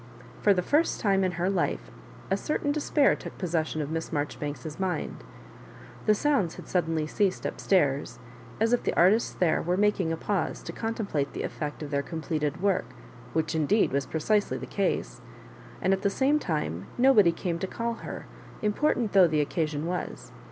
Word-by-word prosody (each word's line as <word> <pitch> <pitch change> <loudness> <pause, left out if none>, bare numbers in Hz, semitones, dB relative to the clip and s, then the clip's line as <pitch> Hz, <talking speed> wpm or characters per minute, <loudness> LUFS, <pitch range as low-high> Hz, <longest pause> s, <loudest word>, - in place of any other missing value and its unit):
For 205 - +5
the 180 -2 +2
first 310 - +2
time 195 -2 +2
m 185 -1 0
her 175 +1 -1
life 190 -3 -1 0.4
a - - +4
certain 290 -1 -1
despair 290 -1 +3
took - - -9
possession 160 -3 -1
of 145 - -6
Miss 165 0 -3
Marjoribanks's 150 +1 -4
mind. 180 - -2 0.8
The 215 - +6
sounds 235 - +1
had - - -10
sud 180 -3 +1
denly 160 -2 -1
ceased 195 +3 0
up - - -4
stairs, 140 -9 +2 0.4
as 225 +2 +2
if 245 - +3
the - - -1
artists 200 +7 +4
there 175 -3 +2
were 180 +2 0
making 200 -5 +2
a 165 - -1
pause 200 +2 -2
to - - -5
contemplate 200 -11 -2
the - - -4
effect 150 0 -4
of 145 - -7
their 140 0 +1
completed 155 +1 -3
work 200 -2 +2 0.3
— 120 0 -18
which 160 0 0
indeed 160 +7 +2
was 140 0 0
pre 160 - -3
cisely 210 +3 +1
the - - -6
case 200 -2 -2 0.3
— - - -18
and 190 - +4
at 190 - 0
the 200 - +2
same 275 +8 +2
time 150 - -2
nobody 240 -8 +6
came 170 0 -3
to 190 - -2
call' 230 +3 -3
her, - - -6 0.4
important 220 +1 +1
though 190 -3 +7
the 155 -2 +1
occasion 150 0 -1
was. 180 +1 -4
180 Hz, 190 wpm, -28 LUFS, 155-210 Hz, 0.8 s, though